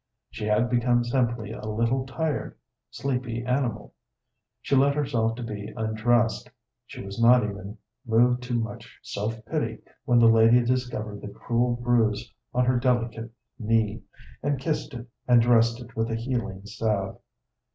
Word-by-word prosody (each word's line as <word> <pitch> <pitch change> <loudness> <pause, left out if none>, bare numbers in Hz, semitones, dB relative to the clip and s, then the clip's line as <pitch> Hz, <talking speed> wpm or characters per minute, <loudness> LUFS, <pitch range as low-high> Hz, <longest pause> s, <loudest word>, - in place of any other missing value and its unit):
She 105 - -5
had 105 +3 +2
become 120 0 +2
simply 120 -3 -1
a 115 - -8
little, 115 +5 0
tired, 155 +3 -3 0.3
sleepy 125 -3 -3
animal. 125 -4 -1 0.7
She 140 - 0
let 140 +1 +4
herself 115 -6 0
be 110 -4 -6
undressed; 110 +1 +1 0.4
she - - -9
was 100 +4 -5
not 125 +1 +6
even 100 +1 -6 0.3
moved 125 +1 +3
to 125 -1 -2
much 110 -3 -5
self 110 +2 -4
pity 115 -5 -2 0.3
when 120 - +3
the 120 - +6
lady 115 +2 +6
discovered 120 -4 -2
the - - -7
cruel 120 +3 0
bruise 120 -2 +1 0.2
on 125 0 +2
her 125 0 +2
delicate 120 -2 0 0.3
knee, 110 -1 +1 0.4
and 145 -1 0
kissed 150 -2 -2
it, 120 0 -8 0.2
and 120 -1 +6
dressed 115 0 +4
it 115 -2 -12
with 115 +1 -1
a 115 - -1
healing 115 -5 -3
salve. 105 -2 -2
115 Hz, 150 wpm, -26 LUFS, 110-125 Hz, 0.7 s, not